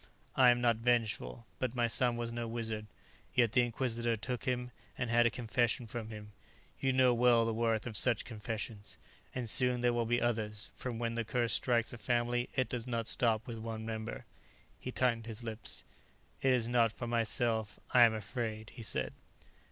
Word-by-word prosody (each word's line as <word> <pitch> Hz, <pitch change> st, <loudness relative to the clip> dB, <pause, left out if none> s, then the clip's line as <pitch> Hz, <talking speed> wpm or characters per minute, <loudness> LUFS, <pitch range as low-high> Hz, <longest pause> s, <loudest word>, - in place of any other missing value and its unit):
I 130 Hz, -2 st, +7 dB
am 120 Hz, 0 st, +3 dB
not 120 Hz, -2 st, +3 dB
vengeful, 115 Hz, -1 st, 0 dB
but 130 Hz, -1 st, -2 dB
my 120 Hz, -1 st, +2 dB
son 120 Hz, +1 st, +2 dB
was 120 Hz, 0 st, -3 dB
no 120 Hz, 0 st, -3 dB
wizard. 110 Hz, -2 st, -4 dB, 0.5 s
Yet 120 Hz, -3 st, +4 dB
the 125 Hz, -, +4 dB
Inquisitor 120 Hz, -1 st, 0 dB
took 125 Hz, +2 st, -4 dB
him 125 Hz, -1 st, -1 dB, 0.3 s
and 125 Hz, -2 st, -2 dB
had 120 Hz, 0 st, +5 dB
a -, -, +2 dB
confession 120 Hz, +1 st, 0 dB
from 110 Hz, 0 st, -6 dB
him; 105 Hz, -1 st, -9 dB, 0.5 s
you 135 Hz, -, +1 dB
know 130 Hz, -1 st, +4 dB
well 120 Hz, -1 st, +4 dB
the 115 Hz, -, 0 dB
worth 115 Hz, -1 st, 0 dB
of 115 Hz, -3 st, -5 dB
such 120 Hz, +1 st, +3 dB
confessions. 110 Hz, -2 st, -6 dB, 0.4 s
And 125 Hz, -2 st, -3 dB
soon 125 Hz, +1 st, +5 dB
there 120 Hz, 0 st, +3 dB
will 120 Hz, -1 st, 0 dB
be 120 Hz, +1 st, +2 dB
others, 110 Hz, -3 st, -2 dB
for 125 Hz, -, -4 dB
when 115 Hz, 0 st, -2 dB
the 115 Hz, 0 st, -1 dB
curse 115 Hz, +1 st, 0 dB
strikes 120 Hz, -2 st, +1 dB
a 120 Hz, -, -8 dB
family 120 Hz, +1 st, 0 dB
it 130 Hz, -1 st, +1 dB
does 125 Hz, -1 st, -4 dB
not 115 Hz, -2 st, -2 dB
stop 115 Hz, -2 st, +1 dB
with 115 Hz, -3 st, -6 dB
one 110 Hz, 0 st, -5 dB
member." 110 Hz, -1 st, -5 dB, 0.5 s
He 130 Hz, -, -5 dB
tightened 115 Hz, -3 st, 0 dB
his 115 Hz, +1 st, -5 dB
lips. 110 Hz, -1 st, -4 dB, 0.6 s
"It 135 Hz, -, +3 dB
is 125 Hz, -3 st, +2 dB
not 120 Hz, -2 st, +3 dB
for 120 Hz, -, -6 dB
myself 115 Hz, -1 st, 0 dB
I 125 Hz, -, +6 dB
am 115 Hz, -2 st, +7 dB
afraid," 110 Hz, 0 st, -4 dB
he -, -, -10 dB
said. 110 Hz, -, 0 dB
115 Hz, 190 wpm, -33 LUFS, 110-120 Hz, 0.6 s, I